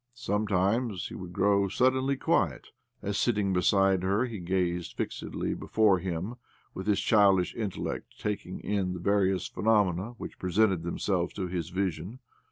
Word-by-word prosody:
Sometimes 105 -1 0
he - - -9
would 90 -2 -7
grow 100 +2 +2
suddenly 130 +6 +2
quiet - - 0 0.3
as, 100 0 -1
sitting 105 -5 +1
beside 95 +1 +3
her, 100 +6 +1
he 115 -5 -6
gazed 90 -1 -1
fixedly - - -3
before 105 -4 +2
him 90 +6 -4 0.4
with 95 +2 -6
his 100 -2 +3
childish 100 -3 +4
intellect 105 -5 -5
taking 100 -3 -4
in 95 -3 -1
the 90 - -5
various 95 -1 +1
phenomena 105 0 +1
which - - -8
presented 95 0 +2
them 85 +1 -4
selves 90 -4 -1
to 95 - -2
his 90 -2 -3
vision. 95 +3 -3
95 Hz, 150 wpm, -29 LUFS, 90-105 Hz, 0.4 s, childish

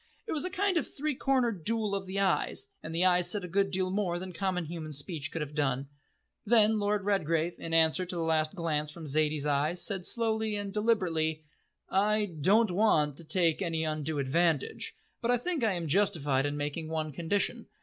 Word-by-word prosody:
It 445 - -5
was 315 +2 0
a - - -1
kind 375 0 +1
of 315 - 0
three 300 +2 -2
cornered 245 - 0
duel 220 +1 -1
of 195 -1 -3
eyes, 195 - 0 0.2
and 165 - -6
the 175 +2 +3
eyes 180 -1 +3
said 205 -3 -1
a - - -4
good 195 +3 +1
deal 185 -1 -1
more 190 -3 0
than 185 +1 -6
common 180 0 -1
human 155 -1 -6
speech 150 +2 -4
could 165 - -2
have 150 0 -8
done. 135 -2 -1 0.5
Then 220 -1 +4
Lord 205 -1 0
Redgrave, 170 -4 +1
in 165 - -6
answer 165 +2 +3
to 180 - -4
the 170 - -1
last 160 +1 +1
glance 155 -4 -1
from 160 +1 -9
Zaidie's 150 0 0
eyes, 150 +4 +1
said 190 -1 -1
slowly 220 -2 +1
and 205 -1 -4
deliberately: 170 -8 +1 0.4
"I 210 +2 +2
don't 210 +6 +4
want 160 -7 +3
to 170 - -5
take 165 0 +1
any 165 -3 -1
undue 155 -1 -2
advantage, 145 +2 0 0.3
but 235 - -1
I 245 - +4
think 325 +2 -2
I 220 -3 +3
am 170 -2 -3
justified 145 -6 +2
in 145 0 -3
making 150 +2 -3
one 155 -1 -2
condition. 170 +7 -1
175 Hz, 200 wpm, -30 LUFS, 155-205 Hz, 0.5 s, Then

